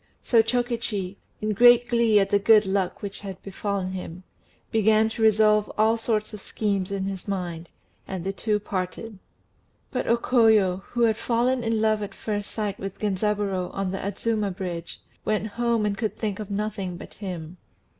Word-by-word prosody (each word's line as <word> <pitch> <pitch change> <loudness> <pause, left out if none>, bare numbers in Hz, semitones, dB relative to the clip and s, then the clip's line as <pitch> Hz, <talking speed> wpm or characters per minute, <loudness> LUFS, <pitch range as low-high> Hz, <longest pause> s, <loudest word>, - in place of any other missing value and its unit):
So 230 -3 +5
Chokichi, 225 -5 -1 0.2
in 215 0 0
great 240 +3 +6
glee 235 -3 +4
at 195 0 0
the 205 - +4
good 215 +1 +6
luck 190 -1 -1
which 200 0 -5
had 195 -2 -7
befallen 195 -1 -3
him, 185 -1 -7 0.5
began 220 0 +4
to 225 - -6
revolve 215 -1 +4
all 220 +1 +4
sorts 215 -2 -1
of 210 - -7
schemes 200 -3 -2
in 195 -1 -2
his 195 0 -5
mind; 175 -4 -4 0.4
and 190 -3 -4
the 195 +1 -2
two 210 +1 0
parted. 195 +2 -5 0.7
But 255 - -2
O 235 - +4
Koyo, 220 -7 +3
who 240 -1 -1
had 220 -2 +3
fallen 240 +2 +1
in 225 -1 0
love 215 -1 +2
at 200 -1 -6
first 205 -2 -3
sight 205 -3 -3
with 195 -1 -6
Genzaburô 200 -2 -1
on 195 -1 -1
the 195 - -3
Adzuma 210 +1 -1
Bridge, 175 -3 -5 0.2
went 215 -2 0
home 235 -1 0
and 205 -1 0
could 220 0 -3
think 210 -3 -3
of 210 -1 -6
nothing 200 -3 -3
but - - -11
him. 180 -4 -7
210 Hz, 175 wpm, -25 LUFS, 195-220 Hz, 0.7 s, great